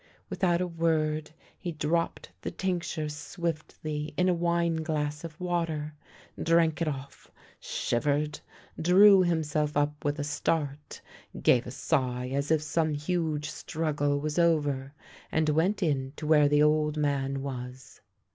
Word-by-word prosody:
Without 175 -2 +1
a 180 - 0
word 160 -2 0 0.3
he 175 - -4
dropped 155 - -1
the - - -3
tincture 175 -4 -2
swiftly 150 -1 -4
in 180 - +3
a - - +4
wineglass 160 -3 0
of 165 -1 -8
water, 165 -4 -2 0.5
drank 165 -1 +3
it 165 - +1
off, 140 -2 -6 0.3
shivered, 145 +4 -1 0.4
drew 190 +3 +7
him 170 -3 +1
self 150 0 -1
up 145 0 0
with 145 +1 0
a 145 - -2
start, 145 0 -2 0.4
gave 120 -1 +4
a - - -4
sigh 125 -2 -1
as 140 +1 -1
if 155 -1 +2
some 155 0 0
huge 155 -1 -1
struggle 145 -2 -1
was 150 +3 -2
over, 145 -5 +1 0.4
and 160 -1 +2
went 180 +7 +2
in 135 -4 0
to 155 - -7
where 150 -2 +5
the 145 0 +4
old 150 0 +2
man 140 -2 0
was. 130 -1 -7
150 Hz, 140 wpm, -28 LUFS, 145-165 Hz, 0.5 s, drew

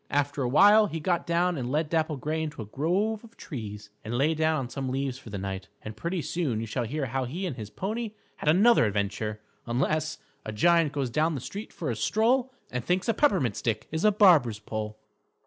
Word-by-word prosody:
After 145 0 0
a 125 - 0
while 205 - +7
he 165 -1 -4
got 175 +2 0
down 170 -1 +1
and 125 0 -3
led 155 +2 +1
Dapple 160 -1 0
Gray 155 +4 -2
into 150 -7 -4
a - - -10
grove 185 - -1
of 230 0 -16
trees 105 - -7
and 115 +2 -3
lay 150 +5 +3
down 160 0 +1
on 125 - -5
some 135 0 -4
leaves 135 0 -2
for 115 - -12
the 100 - -5
night. 95 0 -5 0.2
And 110 0 -7
pretty 170 +6 -3
soon 150 -11 -1
you 115 - -3
shall 120 +2 -2
hear 140 +5 -2
how 130 0 -2
he 170 +10 -4
and 165 -8 -3
his 110 -4 -7
pony 215 - -4 0.2
had - - 0
another 200 - +6
adventure, 105 +1 -2 0.3
unless 155 +6 0 0.3
_A 110 - -6
giant 165 +4 +4
goes 140 -5 -2
down 155 +5 +1
the - - -3
street 200 - -7
for 155 -7 -3
a - - -2
stroll, 235 - +2 0.2
And 125 -1 -3
thinks 180 - 0
a - - +4
peppermint 185 - +2
stick 115 -3 -2
is 160 +1 -2
a 215 - +6
barber's 170 - +5
pole. 110 0 -5
150 Hz, 220 wpm, -27 LUFS, 115-175 Hz, 0.3 s, while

